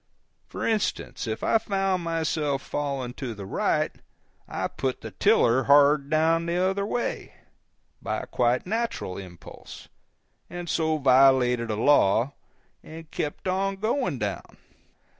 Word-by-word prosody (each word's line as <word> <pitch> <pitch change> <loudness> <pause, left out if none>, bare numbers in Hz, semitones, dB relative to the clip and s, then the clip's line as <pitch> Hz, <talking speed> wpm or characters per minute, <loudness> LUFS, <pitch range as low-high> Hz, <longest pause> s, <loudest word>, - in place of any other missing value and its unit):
For - - -5
instance, 195 - -2
if 110 0 -4
I 225 - +3
found 195 -4 -1
myself 155 -4 -1
falling 140 -4 -3
to 120 -4 -4
the 100 -1 -8
right, 95 - 0 0.6
I - - -3
put 130 -1 -3
the - - -7
tiller 125 +3 +3
hard 140 0 +5
down 165 +2 +2
the 170 +1 -1
other 190 +2 0
way, 240 - -3 0.7
by - - -2
a - - -7
quite 125 0 0
natural 220 - -3
impulse, 90 -3 -12 0.6
and 175 0 -7
so 160 -1 0
violated 130 -3 +4
a 110 - -1
law, 115 +1 +3 0.5
and 160 0 -11
kept 150 +5 -4
on 195 +1 0
going 215 - -1
down. 105 -3 -5
145 Hz, 135 wpm, -26 LUFS, 125-180 Hz, 0.7 s, hard